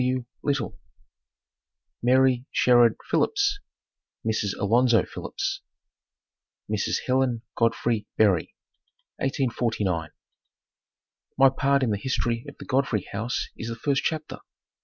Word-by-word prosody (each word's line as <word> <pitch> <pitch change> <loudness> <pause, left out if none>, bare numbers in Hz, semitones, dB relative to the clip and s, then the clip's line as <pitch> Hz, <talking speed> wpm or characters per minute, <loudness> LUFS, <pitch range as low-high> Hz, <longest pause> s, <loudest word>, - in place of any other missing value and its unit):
W. 125 -1 0 0.2
Little) 140 -6 -2 1.2
MARY 130 0 +3
SHERRARD 120 -2 +5
PHILLIPS 405 -1 +1 0.7
(Mrs. 110 -3 -1
Alonzo 120 +3 +3
Phillips) 390 0 -4 1.1
Mrs. - - -1
Helen 130 -3 +1
Godfrey 115 -1 0
Berry 100 -6 +2 0.6
1849. 115 - -1 1.3
My 135 0 +7
part 140 +1 +1
in 120 - +1
the 100 - -1
history 120 -2 -1
of - - -14
the - - -10
Godfrey 125 -7 0
house 110 +5 -2
is 115 - -6
the 115 - -4
first 140 +4 0
chapter. 155 -1 -3
125 Hz, 105 wpm, -25 LUFS, 115-135 Hz, 1.3 s, My